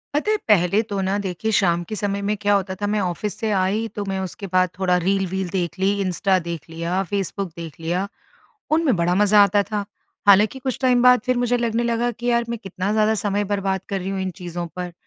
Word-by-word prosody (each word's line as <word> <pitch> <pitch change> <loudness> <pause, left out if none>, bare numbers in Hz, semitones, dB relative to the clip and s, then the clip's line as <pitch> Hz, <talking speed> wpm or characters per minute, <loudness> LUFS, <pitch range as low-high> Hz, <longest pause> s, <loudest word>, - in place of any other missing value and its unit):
पता 420 +8 +1
है, 430 - +2
पहले 200 0 +4
तो 200 -1 -2
ना, 190 +2 0
देखिए, 200 +2 -3
शाम 175 -4 +2
के 215 - -6
समय 200 -1 -2
में 210 - +1
क्या 205 0 +3
होता 190 -1 0
था, 205 - 0
मैं 210 0 0
ऑफ़िस 185 +2 -2
से 220 - -1
आई, 200 +3 +1
तो 205 - -2
मैं 195 -1 -2
उसके 190 +1 -6
बाद 185 0 +4
थोड़ा 180 -1 +2
रील-वील 190 0 -1
देख 180 -1 -2
ली, 190 +1 +3
इंस्टा 190 0 +1
देख 170 -1 -6
लिया, 170 +3 -2
फ़ेसबुक 195 -1 -2
देख 165 -3 -7
लिया। 175 +4 -1 0.7
उनमें 315 -4 +3
बड़ा 170 +1 +1
मज़ा 205 +1 +5
आता 200 0 +3
था। 205 +1 -3 0.4
हालाँकि 210 +6 +5
कुछ 260 -1 -3
टाइम 250 -2 +3
बाद, 250 -1 +6
फिर 255 -1 +2
मुझे 245 0 +1
लगने 235 -1 0
लगा 235 0 0
कि, 240 +1 -7
"यार, 235 0 +2
मैं 235 -1 -3
कितना 190 +1 -3
ज़्यादा 215 0 +3
समय 205 0 0
बर्बाद 195 -1 -1
कर 195 - -1
रही 185 - -4
हूँ 195 -1 -2
इन 190 0 -2
चीज़ों 175 0 -4
पर।" 180 -1 -4
200 Hz, 225 wpm, -22 LUFS, 185-215 Hz, 0.7 s, बाद